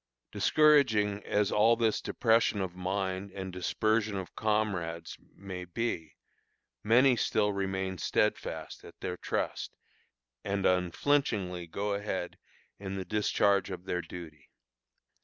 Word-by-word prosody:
Discouraging 115 -10 +4
as 105 0 +1
all 110 +3 +5
this 115 -2 +1
depression 115 -3 +2
of 95 -2 -2
mind 95 +1 -2
and 95 -1 -6
dispersion 105 +3 0
of 95 -1 -7
comrades 95 -7 -1 0.2
may 95 -2 -7
be, 90 -4 -3 0.7
many 125 +4 +5
still 105 -2 +1
remain 95 -1 -2
steadfast - - -1
at - - -14
their 90 - -3
trust - - -3 0.7
and 100 -1 -1
unflinchingly 90 -1 +1
go 100 +5 -2
ahead 100 -3 -3 0.4
in 95 -1 -5
the 95 -1 -4
discharge 100 0 +2
of 90 -1 -7
their 90 -1 -1
duty. 80 -4 -10
100 Hz, 120 wpm, -30 LUFS, 90-110 Hz, 0.7 s, all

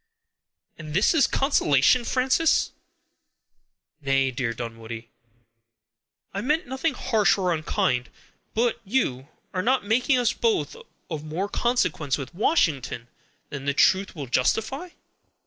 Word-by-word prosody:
"And 155 -1 -7
this 195 - +4
is 315 -4 +4
consolation, 245 - +3
Frances!" 260 +6 +2 1.3
"Nay, 135 -1 +1
dear 125 -2 -2
Dunwoodie, 115 -1 -7 1.2
I 200 - -3
meant 300 +7 0
nothing 265 +6 -2
harsh 215 -3 +2
or 180 -3 +1
unkind; 125 -5 -1 0.5
but 235 +1 +1
are - - -33
you 190 - -1 0.3
not 220 +7 +1
making 250 +6 +2
us 245 -3 +2
both 455 -1 0 0.4
of 155 -2 -4
more 160 +6 -3
consequence 185 - 0
with 140 +2 -7
Washington 150 - 0 0.4
than 140 -1 -6
the 140 0 0
truth 190 +5 +3
will 145 -4 -5
justify?" 225 - 0
185 Hz, 120 wpm, -25 LUFS, -, 1.3 s, this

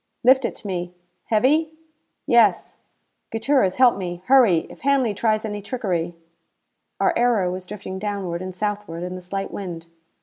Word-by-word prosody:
"Lift 260 +1 +5
it - - -3
to - - -14
me. 180 -2 -4 0.3
Heavy?" 300 +8 +2 0.5
"Yes." 235 -8 +3 0.5
"Gutierrez, 225 -4 +1
help 250 -4 +5
me. 175 -2 -5
Hurry! 235 -11 +5
If - - -14
Hanley 270 -5 +2
tries 215 +1 0
any 205 -1 -4
trickery 185 -7 -2 0.4
" - - -52
Our - - +3
aero 230 -7 +2
was 185 0 -6
drifting 190 -1 -7
downward 195 -4 -3
and 185 -1 -6
southward 205 -4 -3
in 180 0 -4
the 185 - -7
slight 195 +2 -4
wind. 175 -4 -6
205 Hz, 160 wpm, -23 LUFS, 180-240 Hz, 0.5 s, Lift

